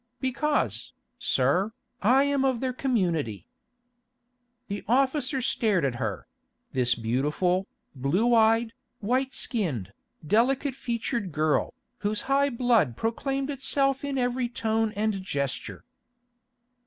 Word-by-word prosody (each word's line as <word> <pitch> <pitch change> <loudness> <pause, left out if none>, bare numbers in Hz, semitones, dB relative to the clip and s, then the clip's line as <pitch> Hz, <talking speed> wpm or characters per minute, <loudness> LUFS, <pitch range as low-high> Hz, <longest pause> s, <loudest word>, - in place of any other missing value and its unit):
"Because, 290 +3 -1 0.3
sir, 195 +5 +1 0.3
I 255 +6 +5
am 280 -1 +1
of 260 -3 +1
their 255 0 -1
community." 170 - -1 1.2
The 200 -1 -4
officer 265 +2 +1
stared 210 - +1
at 135 - 0
her—this 120 +3 -3
beautiful, 150 +11 0 0.3
blue 170 - +1
eyed, 225 0 +4 0.3
white 255 +5 0
skinned, 140 - -2 0.3
delicate 260 - +2
featured 235 -5 -3
girl, 155 - +1 0.2
whose 210 -1 -1
high 280 +1 +2
blood 230 - +2
proclaimed 270 +5 -1
itself 275 0 0
in 280 -1 -2
every 245 -1 0
tone 225 -2 0
and 210 -1 0
gesture. 140 -8 -4
225 Hz, 105 wpm, -27 LUFS, 175-265 Hz, 1.2 s, I